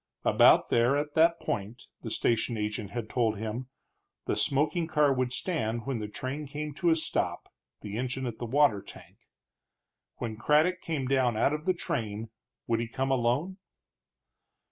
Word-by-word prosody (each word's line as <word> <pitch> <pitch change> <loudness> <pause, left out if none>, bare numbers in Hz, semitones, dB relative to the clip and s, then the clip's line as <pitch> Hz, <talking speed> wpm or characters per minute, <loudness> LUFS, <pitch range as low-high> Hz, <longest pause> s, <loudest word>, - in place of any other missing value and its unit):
About - - +6
there, 120 +4 +3
at 145 0 -2
that 165 +1 +4
point, 120 -4 -4 0.2
the 115 - -5
station 115 +1 0
agent 105 -1 -3
had 115 +1 -4
told 110 -2 0
him, 110 +4 -4 0.6
the - - 0
smoking 155 +4 +1
car 150 -3 +3
would 130 -1 -1
stand 120 - -2
when 135 -4 -2
the 105 - -4
train 135 +7 -5
came 150 +2 -5
to 175 +3 +1
a 165 - +5
stop, 160 - -2 0.3
the 105 +1 -5
engine 130 +1 -2
at 120 -2 -5
the 120 - -4
water 130 -5 +3
tank. - - -14 1.0
When 110 -2 -5
Craddock 155 +9 +3
came 155 -5 -2
down 130 -4 +2
out 140 - +3
of 150 +1 -4
the 185 -1 +2
train, 115 - -4 0.3
would 115 -1 +1
he 115 - -2
come 135 +4 -2
alone? 135 +9 +1
130 Hz, 165 wpm, -29 LUFS, 115-150 Hz, 1.0 s, About